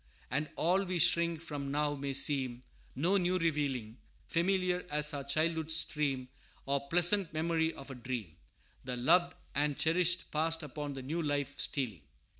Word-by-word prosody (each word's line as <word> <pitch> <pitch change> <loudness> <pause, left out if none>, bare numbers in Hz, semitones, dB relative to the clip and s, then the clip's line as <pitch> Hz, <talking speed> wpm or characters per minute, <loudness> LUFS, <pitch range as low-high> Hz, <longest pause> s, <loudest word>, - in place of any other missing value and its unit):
And 150 +4 0
all 180 +4 +2
we 185 -2 -2
shrink 170 -1 +3
from 145 -4 -5
now 145 +1 0
may 140 -1 -4
seem 130 -3 +2 0.3
No 175 +9 +2
new 180 0 +1
revealing; 140 -9 -1 0.3
Familiar 180 +1 0
as 150 +1 +3
our 140 -1 -3
childhood's 160 +3 +2
stream, 140 -5 0 0.4
Or 140 0 -1
pleasant 175 +2 +4
memory 160 0 0
of 135 0 -10
a - - -5
dream, 120 -9 -5 0.5
The 125 -1 -3
loved 175 +8 +3 0.2
and 145 0 0
cherished 175 +2 +1
past 160 +1 0
upon 145 0 -5
the 135 - -6
new 160 +6 -2
life 145 -2 -2
stealing. 120 - -1
150 Hz, 155 wpm, -32 LUFS, 140-170 Hz, 0.5 s, pleasant